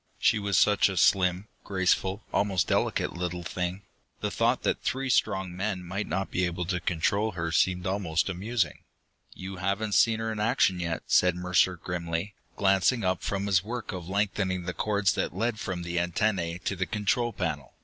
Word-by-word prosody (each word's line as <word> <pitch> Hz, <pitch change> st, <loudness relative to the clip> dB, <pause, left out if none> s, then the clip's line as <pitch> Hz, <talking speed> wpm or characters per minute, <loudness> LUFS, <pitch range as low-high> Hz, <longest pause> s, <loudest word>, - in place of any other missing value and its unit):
She 110 Hz, -, +3 dB
was 100 Hz, -2 st, 0 dB
such 105 Hz, -1 st, +4 dB
a 95 Hz, -, -4 dB
slim, 90 Hz, +2 st, +3 dB, 0.2 s
graceful, 95 Hz, +1 st, 0 dB
almost 95 Hz, -4 st, +2 dB
delicate -, -, 0 dB
little 90 Hz, 0 st, -3 dB
thing; 90 Hz, +3 st, -3 dB, 0.4 s
the -, -, -2 dB
thought -, -, +1 dB
that -, -, 0 dB
three 135 Hz, 0 st, -1 dB
strong 95 Hz, -6 st, +1 dB
men 95 Hz, -1 st, -2 dB
might 95 Hz, +4 st, -4 dB
not 95 Hz, +1 st, -2 dB
be 90 Hz, -, 0 dB
able 85 Hz, 0 st, -3 dB
to 90 Hz, +1 st, -1 dB
control 100 Hz, +6 st, 0 dB
her 85 Hz, -2 st, -3 dB
seemed 90 Hz, +1 st, +2 dB
almost 95 Hz, -4 st, 0 dB
amusing. 95 Hz, -, -1 dB, 0.6 s
"You 95 Hz, 0 st, -7 dB
haven't 100 Hz, +3 st, -1 dB
seen 115 Hz, +1 st, +4 dB
her 110 Hz, 0 st, -2 dB
in 110 Hz, -, -4 dB
action 105 Hz, -5 st, +2 dB
yet," 85 Hz, -2 st, -3 dB
said 90 Hz, -1 st, +4 dB
Mercer 90 Hz, +1 st, +2 dB
grimly, 85 Hz, +3 st, -4 dB, 0.2 s
glancing 95 Hz, +4 st, +2 dB
up 90 Hz, -1 st, 0 dB
from 100 Hz, 0 st, -2 dB
his 95 Hz, -2 st, +3 dB
work 120 Hz, +2 st, -5 dB
of 90 Hz, -3 st, -6 dB
lengthening 95 Hz, -2 st, 0 dB
the 90 Hz, 0 st, -3 dB
cords 100 Hz, -1 st, +1 dB
that -, -, -2 dB
led 110 Hz, +2 st, -1 dB
from 95 Hz, -4 st, -4 dB
the 85 Hz, 0 st, -1 dB
antennae 85 Hz, -1 st, 0 dB
to 100 Hz, -, 0 dB
the 95 Hz, -1 st, -2 dB
control 115 Hz, +3 st, 0 dB
panel. 75 Hz, -, -4 dB
95 Hz, 180 wpm, -28 LUFS, 90-105 Hz, 0.6 s, such